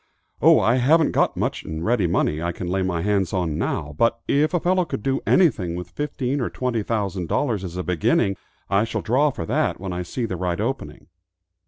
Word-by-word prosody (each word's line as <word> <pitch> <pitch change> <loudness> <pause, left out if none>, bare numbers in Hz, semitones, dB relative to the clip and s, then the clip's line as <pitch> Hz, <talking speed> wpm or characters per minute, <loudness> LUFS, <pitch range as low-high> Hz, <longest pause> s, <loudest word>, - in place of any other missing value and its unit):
"Oh, - - +7
I 120 +3 +3
haven't 150 +5 +4
got - - +1
much - - -2
in 80 +1 -5
ready 110 -4 +2
money 80 -3 0
I 85 +1 -1
can 90 - -6
lay 95 +2 -1
my 90 -3 -1
hands 100 -3 0
on 85 -5 -1
now, 75 +1 -2
but 115 0 +2
if 150 +2 +2
a 175 - +1
fellow 185 +2 +2
could 155 -10 -5
do 135 0 0
anything 110 - +3
with 90 0 -7
fifteen 140 - -2
or 120 - -1
twenty 125 -3 -2
thousand 100 -5 -2
dollars, 115 - 0
as 90 -1 -6
a 90 - -2
beginning, 90 +3 +1 0.3
I 100 +1 +2
shall 115 - -3
draw 135 +6 +3
for 105 -11 -5
that - - 0
when 95 -1 -4
I 90 - -3
see 115 +8 -3
the 95 -5 -4
right 90 -1 -2
opening." - - -4
100 Hz, 215 wpm, -23 LUFS, 90-130 Hz, 0.3 s, Oh